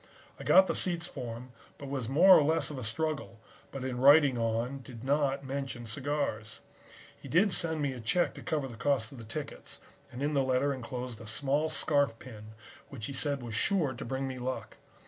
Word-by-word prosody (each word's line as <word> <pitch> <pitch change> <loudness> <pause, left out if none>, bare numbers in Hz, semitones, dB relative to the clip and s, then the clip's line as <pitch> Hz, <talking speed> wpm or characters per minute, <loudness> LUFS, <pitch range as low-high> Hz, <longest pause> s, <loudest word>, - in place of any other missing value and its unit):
I - - -7
got 190 - +7
the - - -2
seats 175 -2 +1
for 125 -8 -5
him, 125 +2 -11 0.3
but 140 - -9
it 135 - -7
was 130 -4 -3
more 180 +7 +8
or - - +6
less 155 -1 +1
of 140 - -6
a - - -6
struggle, 135 0 -3 0.3
but 135 -2 -6
in 125 -2 -3
writing 140 0 +6
on 115 +3 -1
did 125 -3 -11
not 140 0 +1
mention 135 -3 -4
cigars. 115 -3 -3 0.6
He - - -10 0.2
sent 160 -3 +1
me 140 -2 0
a 125 - -8
check 120 +11 +1
to - - -10
cover 150 -4 -2
the 120 -3 -10
cost 130 -5 0
of 135 - -11
the - - -8
tickets 135 +7 -7 0.3
and 125 +3 -5
in 150 +1 0
the 140 - +3
letter 130 +2 +1
enclosed 125 -2 -6
a 110 - -10
small 145 +6 0
scarf 145 -8 +1
pin 110 -3 -11 0.3
which 120 -6 -6
he 140 - -5
said 140 -1 -2
was 115 -2 -6
sure 150 - +1
to 130 +2 -7
bring 135 0 -3
me 130 -1 -5
luck. 130 +1 -5
135 Hz, 210 wpm, -30 LUFS, 120-145 Hz, 0.6 s, more